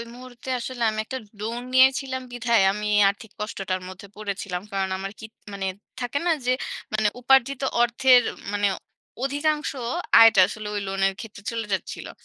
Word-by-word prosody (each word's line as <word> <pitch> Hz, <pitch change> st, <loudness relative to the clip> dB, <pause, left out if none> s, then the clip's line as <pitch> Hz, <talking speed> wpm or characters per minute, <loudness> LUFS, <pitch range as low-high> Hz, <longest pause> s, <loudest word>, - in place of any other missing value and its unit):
মুহূর্তে 250 Hz, 0 st, -11 dB
আসলে 245 Hz, 0 st, -6 dB
আমি 215 Hz, 0 st, -3 dB
একটা 260 Hz, -, -5 dB, 0.2 s
লোন 230 Hz, +3 st, -3 dB
নিয়েছিলাম 260 Hz, 0 st, +4 dB
বিধায় 235 Hz, -2 st, +2 dB
আমি 210 Hz, +1 st, -4 dB
এ -, -, +5 dB
আর্থিক 205 Hz, +2 st, -7 dB
কষ্টটার 195 Hz, -3 st, -3 dB
মধ্যে 185 Hz, +2 st, -11 dB
পড়েছিলাম। 200 Hz, -3 st, -4 dB
কারণ 195 Hz, -1 st, -1 dB
আমার 195 Hz, +1 st, -5 dB
কি 220 Hz, -, -8 dB, 0.3 s
মানে 195 Hz, -1 st, -3 dB, 0.3 s
থাকে 245 Hz, +3 st, -2 dB
না 350 Hz, -, +3 dB
যে 250 Hz, -, +3 dB, 0.4 s
মানে 215 Hz, -1 st, +2 dB
উপার্জিত 265 Hz, +1 st, +3 dB, 0.2 s
অর্থের 245 Hz, +1 st, +5 dB, 0.3 s
মানে 205 Hz, 0 st, +2 dB, 0.6 s
অধিকাংশ 295 Hz, +3 st, 0 dB, 0.5 s
আয়টা 225 Hz, -3 st, +8 dB
আসলে 210 Hz, +1 st, -7 dB
ঐ -, -, -2 dB
লোনের 195 Hz, 0 st, +1 dB
ক্ষেত্রে 220 Hz, -2 st, -9 dB
চলে 230 Hz, -1 st, -3 dB
যাচ্ছিলো। 190 Hz, -, -4 dB
225 Hz, 155 wpm, -24 LUFS, 200-255 Hz, 0.6 s, আয়টা